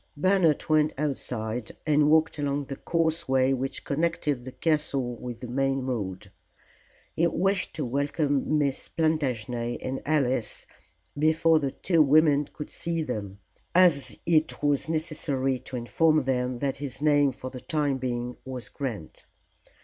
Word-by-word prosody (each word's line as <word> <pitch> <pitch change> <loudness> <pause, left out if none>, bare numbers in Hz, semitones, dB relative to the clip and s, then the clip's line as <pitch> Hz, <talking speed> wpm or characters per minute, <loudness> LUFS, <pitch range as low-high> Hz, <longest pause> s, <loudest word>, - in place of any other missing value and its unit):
Bernard 180 -2 +3
went 155 0 +3
outside 125 -6 -3
and 150 -1 +4
walked 160 0 +3
along 145 0 -1
the 135 - -6
causeway 145 -5 +1
which 135 +1 -3
connected 145 -3 -1
the 130 - -6
castle 140 -5 0
with 120 -1 -7
the 125 - -5
main 135 +2 0
road. 100 -8 -4 0.8
He 170 - +3
wished 185 +3 0
to 155 - -2
welcome 145 +3 0
Miss 140 -3 -1
Plantagenet 125 -7 -1
and 130 +1 -4
Alice 130 -6 0 0.5
before 160 +2 +3
the 140 -2 -1
two 165 +4 +1
women 150 0 +5
could 150 - -9
see 165 -1 -2
them, 100 -7 -5 0.3
as 175 -6 +4
it 160 -3 +1
was 145 +1 +1
necessary 145 -5 -1
to 130 - -9
inform 155 +6 +2
them 125 -1 -1
that 135 +1 -2
his 135 -2 -5
name 145 -2 +4
for 130 0 -8
the 125 - -8
time 145 -4 -1
being 125 -1 -3
was 130 -2 -7
Grant. 115 - -6
140 Hz, 140 wpm, -27 LUFS, 125-155 Hz, 0.8 s, women